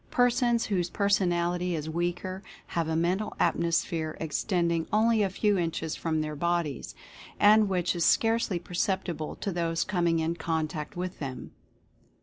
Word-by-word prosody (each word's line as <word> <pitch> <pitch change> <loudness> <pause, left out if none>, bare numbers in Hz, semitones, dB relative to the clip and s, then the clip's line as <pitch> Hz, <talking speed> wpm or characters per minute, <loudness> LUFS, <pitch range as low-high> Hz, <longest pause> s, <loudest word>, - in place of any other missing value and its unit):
Persons 240 -1 +2
whose 180 -4 0
personality 180 -3 +1
is 155 -1 -4
weaker 175 +3 -2 0.3
have 165 -2 0
a 160 - -1
Mental 180 +6 0
Atmosphere 165 -1 0
extending 170 +1 0
only 220 +1 +3
a 200 - +2
few 205 +1 +1
inches 165 -2 -2
from 160 -2 -1
their 155 0 -3
bodies, 160 - -2 0.4
and 210 0 +6
which 180 -1 0
is 170 - 0
scarcely 225 -3 +2
perceptible 175 -2 -2
to 200 - -3
those 165 -1 0
coming 175 -3 +1
in 165 +1 -1
contact 160 +2 -3
with 180 +1 -4
them. 135 -3 -6
175 Hz, 140 wpm, -28 LUFS, 165-195 Hz, 0.4 s, and